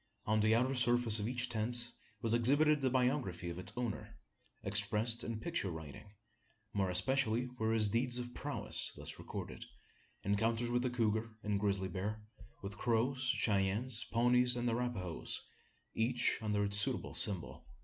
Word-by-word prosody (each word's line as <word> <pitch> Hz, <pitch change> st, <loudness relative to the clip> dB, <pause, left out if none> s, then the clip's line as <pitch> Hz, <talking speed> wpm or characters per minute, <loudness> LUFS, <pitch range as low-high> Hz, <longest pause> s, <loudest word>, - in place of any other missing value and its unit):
On 110 Hz, +1 st, +2 dB
the 110 Hz, +1 st, +3 dB
outer 130 Hz, +3 st, +1 dB
surface 120 Hz, -3 st, +3 dB
of 105 Hz, -, -2 dB
each 125 Hz, 0 st, -1 dB
tent 120 Hz, +1 st, +1 dB, 0.3 s
was 115 Hz, -1 st, +4 dB
exhibited 145 Hz, +6 st, +3 dB
the 130 Hz, -, +2 dB
biography 125 Hz, -9 st, 0 dB
of 85 Hz, -, -7 dB
its 90 Hz, -, -1 dB
owner 120 Hz, -4 st, -4 dB, 0.5 s
expressed 115 Hz, +2 st, +3 dB
in 115 Hz, -1 st, -4 dB
picture 165 Hz, -, -2 dB
writing. 80 Hz, +5 st, -9 dB, 0.6 s
More 95 Hz, -2 st, 0 dB
especially 125 Hz, +4 st, +1 dB
were 110 Hz, 0 st, +1 dB
his 110 Hz, -2 st, +4 dB
deeds 120 Hz, +4 st, +1 dB
of 120 Hz, 0 st, -5 dB
prowess -, -, 0 dB
thus -, -, -5 dB
recorded -, -, -7 dB, 0.6 s
encounters 115 Hz, +4 st, 0 dB
with 120 Hz, 0 st, +1 dB
the 125 Hz, -, 0 dB
couguar 110 Hz, -2 st, -1 dB
and 105 Hz, -1 st, -1 dB
grizzly 100 Hz, -2 st, 0 dB
bear 100 Hz, +4 st, -4 dB, 0.4 s
with 100 Hz, +1 st, -7 dB
Crows, 120 Hz, +3 st, 0 dB
Cheyennes, 110 Hz, -1 st, +1 dB
Pawnees, 125 Hz, +1 st, +3 dB
and 120 Hz, 0 st, -2 dB
Arapahoes 115 Hz, -8 st, -2 dB, 0.5 s
each 120 Hz, +1 st, +1 dB
under 105 Hz, -2 st, 0 dB
its 100 Hz, 0 st, +2 dB
suitable 100 Hz, -, +2 dB
symbol. 95 Hz, -4 st, +1 dB
115 Hz, 150 wpm, -35 LUFS, 105-125 Hz, 0.6 s, was